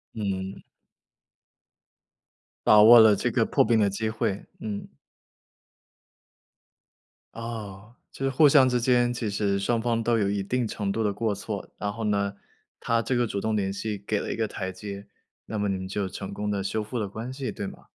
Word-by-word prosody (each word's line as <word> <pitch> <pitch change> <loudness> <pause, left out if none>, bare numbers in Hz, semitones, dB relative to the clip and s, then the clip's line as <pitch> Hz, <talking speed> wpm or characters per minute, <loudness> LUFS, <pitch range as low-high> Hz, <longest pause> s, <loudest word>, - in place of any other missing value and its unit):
嗯。 95 -3 -3 2.1
把 105 0 +8
握 115 +2 +10
了 110 -2 +7
这 - - -1
个 - - +2
破 - - +3
冰 115 -2 +3
的 105 - +4
机 110 +3 -2
会， 110 -3 -2 0.2
嗯。 105 -2 -5 2.5
哦， 110 -1 -7 0.2
就 135 - -4
是 135 - +2
互 145 +3 +5
相 135 -2 +6
之 125 -1 +1
间 120 0 +2
其 115 -3 -3
实 100 -1 0
双 115 +3 0
方 115 -1 0
都 115 0 +2
有 100 -2 +1
一 100 -1 -1
定 125 +2 -1
程 100 -2 -3
度 110 +2 -1
的 105 - 0
过 110 0 -1
错， - - -5
然 100 0 -2
后 110 +2 -6
呢， 100 -1 0 0.5
她 115 0 +1
这 125 - -1
个 120 -1 +2
主 100 -2 -3
动 110 +1 0
联 95 -2 0
系 105 +1 -3
给 105 +1 -2
了 - - -4
一 - - -2
个 110 -1 -1
台 95 -2 -5
阶， 100 +1 -8 0.4
那 110 - -5
么 105 0 0
你 95 - 0
们 95 0 -6
就 100 0 -2
成 95 +1 -7
功 105 +1 -3
地 100 -1 -1
修 105 +3 -1
复 110 +4 -5
了 105 -3 -1
关 110 +6 -6
系 130 -4 -4
对 100 - -5
吗？ - - -11
105 Hz, 210 characters per minute, -26 LUFS, 100-115 Hz, 2.5 s, 握